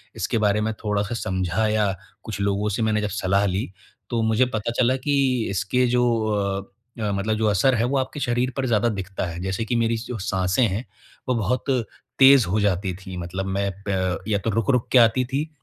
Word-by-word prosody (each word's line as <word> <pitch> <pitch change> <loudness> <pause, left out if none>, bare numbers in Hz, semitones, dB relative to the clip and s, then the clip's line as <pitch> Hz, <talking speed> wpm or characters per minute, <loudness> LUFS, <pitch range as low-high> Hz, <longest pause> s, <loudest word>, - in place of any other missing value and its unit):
इसके - - -1
बारे 105 0 +2
में 110 +1 -1
थोड़ा-सा 105 +1 -1
समझा 95 0 -1
या, 105 -2 +1 0.3
कुछ 110 -3 -6
लोगों 100 +1 0
से 110 +3 -2
मैंने 110 -1 +1
जब 105 - -2
सलाह 100 0 +1
ली, 95 0 -2 0.4
तो 120 -2 0
मुझे 110 +3 +3
पता 115 -2 -3
चला 125 +1 +3
कि 135 -5 +2
इसके 100 +7 +1
जो 125 0 +2 1.0
अ, 105 -2 -1
मतलब 100 +2 -1
जो 110 - +1
असर 105 +6 +3
है, 115 - +1
वो 135 +3 0
आपके 130 +3 -2
शरीर 125 -1 0
पर 135 - 0
ज़्यादा 115 0 +2
दिखता 95 -3 -4
है। 85 0 -6
जैसे 95 +4 -2
कि 120 - -1
मेरी 115 0 +1
जो 120 +1 -6
साँसें 95 +4 0
हैं, 105 +6 -3 0.4
वो 125 - +2
बहुत 115 +3 -1 0.5
तेज़ 135 -3 +8
हो 100 +5 +1
जाती 95 -2 0
थी, 95 -1 -9
मतलब 90 +2 -4
मैं 100 +1 -1 0.2
प 95 -2 0
या 105 -2 +2
तो 100 - -2
रुक-रुक 115 +3 +1
के - - +5
आती 120 +2 +4
थी, 140 +5 -2
110 Hz, 205 wpm, -23 LUFS, 100-120 Hz, 1.0 s, तेज़